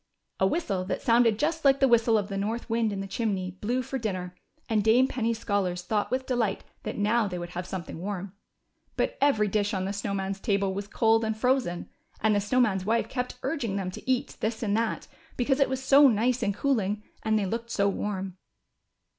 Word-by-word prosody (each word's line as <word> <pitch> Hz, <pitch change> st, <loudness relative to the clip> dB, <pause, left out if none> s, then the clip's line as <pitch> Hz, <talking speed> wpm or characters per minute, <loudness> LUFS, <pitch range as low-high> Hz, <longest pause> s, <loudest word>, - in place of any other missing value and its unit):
A 190 Hz, -, +4 dB
whistle, 195 Hz, -, -1 dB
that 190 Hz, -, -3 dB
sounded 230 Hz, -2 st, +4 dB
just 320 Hz, +5 st, -1 dB
like 275 Hz, -1 st, +5 dB
the 270 Hz, -, +5 dB
whistle 230 Hz, -2 st, +4 dB
of 205 Hz, -2 st, -1 dB
the 200 Hz, -, -5 dB
north 215 Hz, +4 st, -2 dB
wind 225 Hz, -2 st, +1 dB
in 195 Hz, -1 st, -3 dB
the 195 Hz, -, -5 dB
chimney, 195 Hz, -3 st, -2 dB
blew 235 Hz, +7 st, -2 dB
for 265 Hz, +1 st, -4 dB
dinner, 185 Hz, -5 st, -3 dB, 0.3 s
and 215 Hz, -2 st, +1 dB
Dame 240 Hz, +4 st, +5 dB
Penny's 230 Hz, -3 st, -1 dB
scholars 190 Hz, -5 st, -1 dB
thought 205 Hz, +3 st, -1 dB
with 260 Hz, +1 st, -1 dB
delight 230 Hz, -6 st, 0 dB, 0.2 s
that -, -, -5 dB
now 215 Hz, +2 st, +2 dB
they 180 Hz, -2 st, -4 dB
would 175 Hz, 0 st, -6 dB
have 180 Hz, 0 st, -5 dB
something 175 Hz, -4 st, -6 dB
warm. 195 Hz, 0 st, -5 dB, 0.6 s
But -, -, 0 dB
every 270 Hz, -7 st, +3 dB
dish 205 Hz, +1 st, 0 dB
on 190 Hz, 0 st, -1 dB
the 195 Hz, -, -2 dB
Snow 200 Hz, 0 st, -3 dB
Man's 195 Hz, 0 st, -3 dB
table 195 Hz, -1 st, 0 dB
was 200 Hz, +1 st, -4 dB
cold 225 Hz, +2 st, +3 dB
and 220 Hz, -1 st, -1 dB
frozen, 250 Hz, -7 st, 0 dB, 0.3 s
and 220 Hz, 0 st, +3 dB
the 205 Hz, -, +2 dB
Snow 230 Hz, +6 st, +1 dB
Man's 200 Hz, -6 st, +2 dB
wife 225 Hz, +4 st, 0 dB
kept 250 Hz, -1 st, -3 dB
urging 235 Hz, -11 st, -2 dB
them 190 Hz, -2 st, -2 dB
to 220 Hz, -, -9 dB
eat 255 Hz, -1 st, 0 dB
this 220 Hz, +2 st, -2 dB
and 205 Hz, -2 st, +1 dB
that, 225 Hz, 0 st, -1 dB, 0.3 s
because 265 Hz, +3 st, +1 dB
it 275 Hz, -, +3 dB
was 265 Hz, 0 st, -3 dB
so 280 Hz, +2 st, +7 dB
nice 240 Hz, +2 st, +2 dB
and 205 Hz, -3 st, 0 dB
cooling, 210 Hz, -7 st, 0 dB, 0.2 s
and 220 Hz, 0 st, +1 dB
they 205 Hz, -, 0 dB
looked 230 Hz, +4 st, -3 dB
so 200 Hz, -3 st, +1 dB
warm. 195 Hz, -2 st, -3 dB
215 Hz, 215 wpm, -27 LUFS, 195-240 Hz, 0.6 s, so